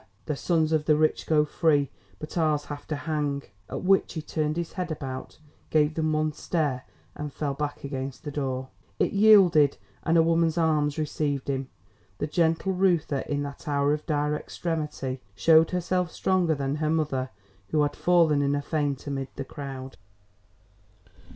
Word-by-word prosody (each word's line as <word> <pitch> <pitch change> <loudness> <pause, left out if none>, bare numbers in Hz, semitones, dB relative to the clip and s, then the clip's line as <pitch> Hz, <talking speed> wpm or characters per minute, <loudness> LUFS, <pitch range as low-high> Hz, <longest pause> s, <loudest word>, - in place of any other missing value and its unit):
The 150 - -2
sons 160 +1 +1
of 155 -1 +1
the 155 - +4
rich 155 +1 +1
go 150 -1 +4
free, 145 -3 +2 0.3
but 155 - -8
ours 155 -3 +1
have 145 -1 -8
to 155 - -2
hang!" 145 -2 -2 0.3
At - - -5
which 195 +1 +3
he 160 - -4
turned 155 0 -1
his 170 -1 -3
head 180 -2 -3
about, 135 -4 -6 0.3
gave 150 0 +3
them 155 0 0
one 155 0 0
stare 145 -5 -1 0.3
and 150 -1 -6
fell 145 0 -2
back 145 +1 -4
against 135 -1 -5
the 145 - -5
door. 130 -2 -3 0.3
It - - +1
yielded 195 -9 +6 0.2
and 170 0 +2
a 165 - +6
woman's 165 0 +2
arms 150 -3 +2
received 145 -3 -2
him. 135 -1 -3 0.5
The - - -1
gentle 165 +4 +1
Reuther 175 -6 +2
in 145 +1 -2
that 140 +1 -8
hour 145 0 +2
of 150 - -3
dire 150 -1 +1
extremity, 150 -5 -4
showed 160 +8 +5
herself 180 -1 -1
stronger 180 -4 +1
than 140 +1 -2
her 155 0 0
mother 150 -5 0 0.4
who 150 -1 +2
had 145 - -1
fallen 165 -5 +3
in 140 0 +1
a 145 - -1
faint 145 -3 -1
amid 135 -2 -3
the 135 - -5
crowd. 135 -2 -7
150 Hz, 170 wpm, -26 LUFS, 140-160 Hz, 0.5 s, yielded